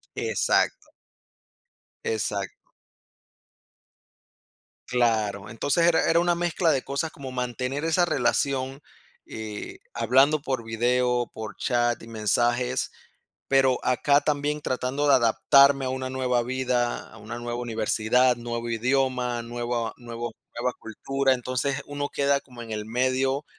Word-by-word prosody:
Exacto. - - 0 1.1
Exacto. 460 -1 -3 2.2
Claro. 110 -5 +1
Entonces 145 +9 +1
era 170 -1 +3
era 165 - +4
una 175 0 +2
mezcla 170 -1 +1
de 135 -3 +1
cosas 140 +3 -2
como 135 -4 -8
mantener 125 +3 -3
esa 165 +2 +3
relación, 135 -5 0 0.5
eh, 110 -1 -7 0.2
hablando 135 +6 +4
por 130 -5 -2
video, 120 +1 +1
por 110 -3 -7
chat 120 -2 0
y 115 - -11
mensajes, 120 +3 0 0.6
pero 135 -2 +4
acá 140 +3 +3
también 150 0 -1
tratando 130 +2 -1
de 140 - +7
adaptarme 135 +3 +5
a 130 - -1
una 130 0 -3
nueva 125 -2 0
vida, 125 -1 -1
a - - -13
una 115 +3 -7
nueva 120 0 -4
universidad, 120 +2 +2
nuevo 120 0 -4
idioma, 125 0 0
nueva 120 -1 -3
nuevo 120 -1 -6 0.2
nueva 125 +1 0
cultura. 135 +4 0
Entonces, 130 +2 -2
uno 145 0 -3
queda 140 0 +1
como 125 -3 -12
en 115 -1 -8
el 105 0 -3
medio 130 +4 0
125 Hz, 125 wpm, -26 LUFS, 120-140 Hz, 2.2 s, de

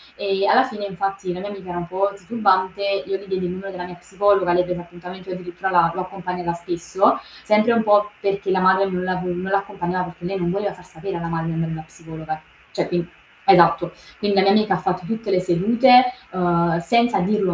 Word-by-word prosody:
ehm, 195 0 0
alla 255 - +6
fine 210 -6 -5
infatti 195 -1 -3
la 180 - -7
mia 205 +2 -6
amica 195 -3 -9
era 175 - -4
un 175 - -6
po' 195 +3 -1
titubante, 190 -1 0 0.2
io 195 - -2
gli 195 - -13
diedi 190 -1 -2
il 175 - -2
numero 195 +2 -7
della 180 -1 -6
mia 180 0 -10
psicologa, 190 0 +1
lei 180 0 +3
prese 180 -1 -4
appuntamento 180 +2 -11
e 185 - -3
io 185 - -6
addirittura 180 +1 -5
l'ha 170 -2 +4
l'ho 185 - -3
accompagnata 180 -2 -4
spesso, 170 +2 0 0.2
sempre 215 +2 +3
un 230 -1 +2
po' 210 0 +3
perché 200 0 -2
la 185 - +2
madre 190 +1 +4
non 180 -1 -2
la 185 0 -1
non 180 -1 -3
l'accompagnava 190 -2 -2
perché 180 0 -11
lei 195 +2 -2
non 175 -2 -1
voleva 200 +1 -2
far 180 - -16
sapere 185 +2 -6
alla 170 0 -4
madre 165 0 -3
che - - -2
andava 165 0 -2
da - - -5
una 155 - -10
psicologa. 160 -1 -8 0.3
Cioè - - -2
quin 175 -1 -2 0.4
esatto. 170 -2 +5 0.3
Quindi 205 -1 0
la 190 - +6
mia 195 - +5
amica 215 -1 +3
ha - - +1
fatto 185 -1 -2
tutte 225 +1 -3
le 185 - +3
sedute, 230 +9 +5 0.3
uhm, 170 -2 +1
senza 235 +4 +2
dirlo 195 -1 +1
185 Hz, 230 wpm, -21 LUFS, 175-200 Hz, 0.4 s, alla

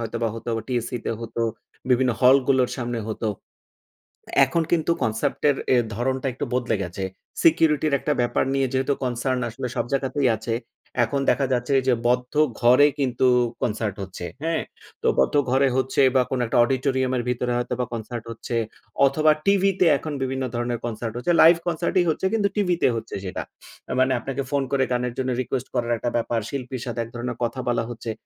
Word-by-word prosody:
হয়তোবা 115 0 -2
হতো, 115 +1 -5 0.2
টিএসসি 125 0 -2
তে - - -1
হতো, 115 0 -4 0.5
বিভিন্ন 125 0 +4
হল 130 +1 +7
গুলোর 130 -2 +3
সামনে 120 -1 -3
হতো। 110 0 -2 1.2
এখন 165 +5 0
কিন্তু 170 -1 +2
কনসেপ্ট 115 +5 -1
এর 140 - +1 0.2
এ - - +5 0.2
ধরণটা 130 +3 -1
একটু 125 - -4
বদলে 125 -2 +1
গেছে। 90 +2 -5 0.4
সিকিউরিটির 155 -2 +4
একটা 150 - 0
ব্যাপার 120 - +1
নিয়ে 135 -1 +1
যেহেতু 135 +2 +1
কনসার্ন 125 +1 -1
আসলে 125 +3 -5
সব - - 0
জায়গাতেই 135 0 +1
আছে। 115 +2 -3 0.5
এখন 130 +5 -1
দেখা 140 - +2
যাচ্ছে 125 +2 0
যে 130 - +5
বদ্ধ 125 0 0 0.3
ঘরে 125 +4 +6
কিন্তু 130 -1 +1 0.3
কনসার্ট 105 -3 -1
হচ্ছে। 90 -2 -7 0.2
হ্যাঁ? 165 -1 0 0.4
তো - - 0
বদ্ধ 65 - +2
ঘরে 135 +2 +3
হচ্ছে 130 +1 +1
বা 130 - +6
কোনো 130 -2 -1
একটা - - 0
অডিটোরিয়াম 130 0 0
এর 120 - -1
ভিতরে 125 0 -1
হয়তো 120 0 -2
বা 125 - +1
কনসার্ট 115 +1 -5
হচ্ছে, 115 +1 -5 0.5
অথবা 155 +3 +4
টিভিতে 195 -1 +3
এখন 155 -2 -5
বিভিন্ন 130 0 -2
ধরণের 120 0 -2
কনসার্ট 115 -1 -4
হচ্ছে। 150 +8 0
লাইভ 165 +2 +8
কনসার্ট 170 +1 -1
ই - - +3
হচ্ছে 160 - -1
কিন্তু 210 -3 +2
টিভিতে 180 -4 +2
হচ্ছে 115 0 -5
সেটা। 95 - -4 0.6
মানে 130 0 +3
আপনাকে 135 +3 -4
ফোন 140 -1 +1
করে 140 -1 +2
গানের 125 -1 -1
জন্য 130 0 -1
রিকোয়েস্ট 130 +1 -3
করার 120 0 0
একটা 120 - -2
ব্যাপার, 115 0 0
শিল্পীর 130 -3 -5
সাথে 120 -2 -4
এক 115 - -10
ধরনের 120 0 -4
কথা 120 +2 -2
বলা 120 -1 +1
হচ্ছে। 115 -1 -5
125 Hz, 180 wpm, -24 LUFS, 120-140 Hz, 1.2 s, লাইভ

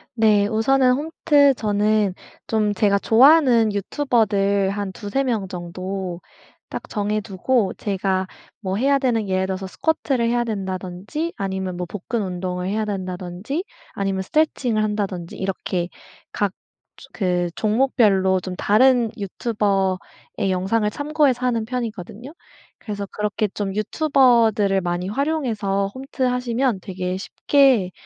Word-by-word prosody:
네. 210 -3 +4
우선은 250 +4 +3
홈트. 290 -1 +3
저는 210 -2 +1 0.3
좀 215 -2 +1
제가 200 0 +2
좋아하는 245 -2 +5
유튜버들 200 -4 +1
한 200 -1 -3
두세 210 +8 -2
명 225 -7 -1
정도 185 0 -5 0.5
딱 - - -7
정해 210 0 -1
두고 210 +2 0
제가 190 -2 -1 0.3
뭐 190 -3 -3
해야 275 +5 +2
되는 230 -6 0
예를 185 0 +1
들어서 190 0 -3
스쿼트를 270 -2 0
해야 240 0 +1
된다든지 195 - -4
아니면 190 -2 -3
뭐 180 - -3
복근 210 +5 -3
운동을 180 -1 -3
해야 215 +2 -1
된다든지 185 - -4 0.4
아니면 195 -1 0
스트레칭을 245 -3 +1
한다든지 200 -5 -3
이렇게 185 -2 -2 0.5
각 205 -2 0
즈 - - -21
그 180 -3 0
종목별로 210 -5 +2
좀 180 0 -6
다른 240 +3 +4
유튜버의 195 -2 -2
영상을 210 +4 +1
참고해서 285 -2 +1
하는 235 -3 +1
편이거든요? 230 - -5 0.4
그래서 205 -2 -5
그렇게 210 0 -1
좀 195 -2 -3
유튜버들을 225 -5 +3
많이 175 +1 -2
활용해서 215 -7 -1
홈트하시면 250 -4 -1
되게 185 -1 -4
쉽게 250 -1 +2
210 Hz, 295 characters per minute, -22 LUFS, 190-245 Hz, 0.5 s, 좋아하는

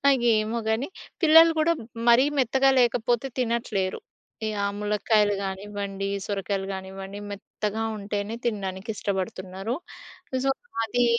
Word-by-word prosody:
ఇగ 255 - -3 0.2
ఎమో 220 +2 -2
గని, 225 +5 +1 0.3
పిల్లలు 325 0 +8
గూడా 320 +2 +4 0.3
మరీ 240 +3 +7
మెత్తగా 265 +1 +4
లేకపోతే 240 +1 +2
తినట్లేరు. 230 -6 0 0.5
ఈ - - 0 0.2
ఆ - - +2
ములకాయలు 210 0 +2
గానివ్వండి, 195 0 -4 0.2
సొరకాయలు 195 -1 -2
గానివ్వండి 190 +1 -7
మెత్తగా 210 +2 -3
ఉంటేనే 205 +2 -3
తినడానికి 195 -2 -3
ఇష్టపడుతున్నారు. 190 +2 -3 0.7
సో 270 - +4 0.3
అది 245 +2 +2
210 Hz, 115 wpm, -26 LUFS, 195-240 Hz, 0.7 s, పిల్లలు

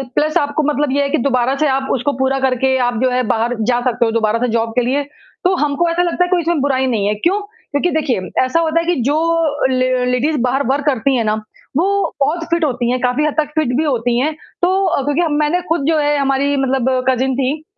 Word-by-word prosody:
Plus 310 +1 +2
आपको 290 +1 0
मतलब 295 -2 0
ये 285 - +2
है 280 - -1
कि - - +1
दोबारा 255 0 +1
से - - +3
आप 270 0 0
उसको 270 +2 0
पूरा 265 0 +1
करके 265 0 +1
आप 245 -2 -2
जो 260 - +3
है, 250 0 +1
बाहर 230 +1 0
जा 245 +2 +1
सकते 245 -1 0
हो 225 - 0
दोबारा 225 0 +1
से 250 - 0
जॉब 230 0 0
के 250 - +3
लिए, 275 +4 0 0.4
तो 370 +1 +2
हमको 300 +2 0
ऐसा 335 +1 0
लगता 355 +1 +1
है 360 - -2
कोई 360 -2 +2
इसमें 340 +1 0
कोई 290 - -1
बुराई 265 -2 +1
नहीं 215 -5 0
है 210 - +1
क्यों? 345 - 0 0.3
क्योंकि 285 +5 +1
देखिए। 300 -8 0 0.2
ऐसा 255 +6 +1
होता 330 0 +1
है 335 - -2
कि 350 +1 +1
जो 310 +1 +1
ले 255 -1 +1
लेडीज 250 +5 0
बाहर 255 +3 +1
वर्क 275 +2 0
करती 270 -1 +1
हैं 235 - +1
ना, 215 - +1 0.4
वो 395 +4 0
बहुत 305 +5 0
फिट 335 0 +1
होती 245 -4 -1
हैं, 255 - 0
काफ़ी 250 +4 +1
हद 305 - 0
तक 310 -1 +1
फिट 310 -6 +1
भी 310 - +1
होती 245 -5 0
हैं, 300 +5 0 0.3
तो 365 -5 +1
क्योंकि 300 +4 +1
मैंने 305 +4 +1
खुद 330 -1 +1
जो 320 -1 +2
है, 295 0 +1
हमारी 275 +1 +1
मतलब 260 -1 0
कज़िन 260 +1 +1
थी 275 +4 -1
275 Hz, 245 wpm, -17 LUFS, 255-310 Hz, 0.4 s, से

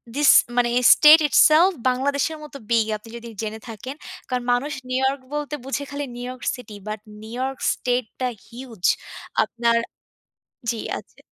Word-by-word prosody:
this 290 0 +6 0.3
মানে 240 -1 +3 0.2
state 310 +1 +8
itself 325 +7 +6 0.2
বাংলাদেশের 280 +4 0
মতো 295 -2 -9
বিগ, 230 -2 +3
আপনি 215 +2 -16
যদি 235 0 -10
জেনে 220 0 -5
থাকেন। 240 +5 -7 0.3
কারণ, 250 -1 -1
মানুষ 280 +5 -1 0.2
নিউ 255 - 0
ইয়র্ক 270 0 0
বলতে 295 0 -3
বোঝে, 275 +1 -3
খালি 285 0 -3
new 245 - -7
York 255 0 -8
city, 225 -4 -11
but 215 0 -4 0.2
new 225 +2 -8
York 265 0 -3 0.2
স্টেট-টা 250 0 -2 0.2
huge. 235 -5 -11 0.6
আপনার 235 0 0 0.9
জ্বী। 230 - -2 0.2
আচ্ছা। - - -14
255 Hz, 155 wpm, -23 LUFS, 235-285 Hz, 0.9 s, state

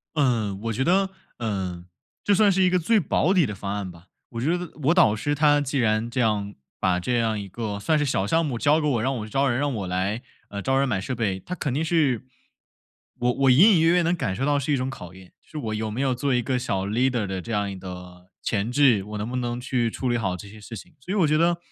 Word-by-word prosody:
嗯， 115 -9 +1
我 115 - -2
觉 130 +5 -1
得， 190 +3 +2 0.3
呃 95 -6 -3 0.4
这 205 - +3
算 205 +1 +5
是 190 0 +2
一 180 - +4
个 180 - +3
最 215 +6 +3
保 180 0 +1
底 180 - +4
的 105 -5 -3
方 100 +1 -4
案 100 -3 -4
吧。 85 +1 -16 0.2
我 115 -1 -5
觉 165 +7 +1
得 180 -1 -6
我 160 - +4
导 170 - +5
师 145 +7 -1
他 145 0 +4
既 140 -1 -2
然 110 -1 +1
这 125 +1 -2
样 105 -2 0 0.3
把 90 -1 +2
这 120 +6 0
样 110 -2 0
一 100 - -5
个 105 0 -4
算 155 +9 +1
是 150 - +1
小 100 -7 0
项 165 +8 +2
目 120 -5 -3
交 150 +4 +3
给 150 - -1
我， 120 -6 +1
让 135 +2 0
我 110 - -5
去 - - -13
招 140 +4 +1
人， 120 +1 0
让 145 0 0
我 100 -4 -3
来， 95 +6 -2 0.3
呃， 100 0 -6
招 135 0 +1
人 140 - +2
买 110 -6 0
设 130 +6 -4
备， 105 -5 -1
他 180 - -6
肯 140 -7 -3
定 155 +3 0
是 150 -8 +1 0.9
我 125 0 +1
我 135 +1 +3
隐 190 - +7
隐 165 - +4
约 165 - +4
约 180 - +4
能 170 +2 +1
感 110 - -2
受 135 +8 -2
到 145 -1 +2
是 140 +2 -1
一 140 - +3
种 130 0 -2
考 90 -9 -8
验， 95 -1 -15
就 - - -28
是 155 - -6
我 110 -5 -3
有 110 0 -2
没 115 - -4
有 135 -2 +1
做 130 +1 0
一 125 - +2
个 125 +1 -1
小 100 -6 -2
leader 120 0 +1
的 95 -1 -4
这 115 - -6
样 100 -1 0
一 95 - -6
个 90 -1 -10
潜 110 +2 -1
质， 125 -7 +4
我 105 0 -6
能 105 - -3
不 125 - -4
能 120 -1 -2
去 125 -2 0
处 130 - -3
理 120 - +1
好 95 -6 -1
这 100 - -10
些 110 +2 -13
事 115 +2 -9
情。 - - -12
所 180 +9 -6
以 - - -1
我 180 -6 +4
觉 155 +1 +2
得， 170 +1 +2
120 Hz, 315 characters per minute, -24 LUFS, 105-145 Hz, 0.9 s, 隐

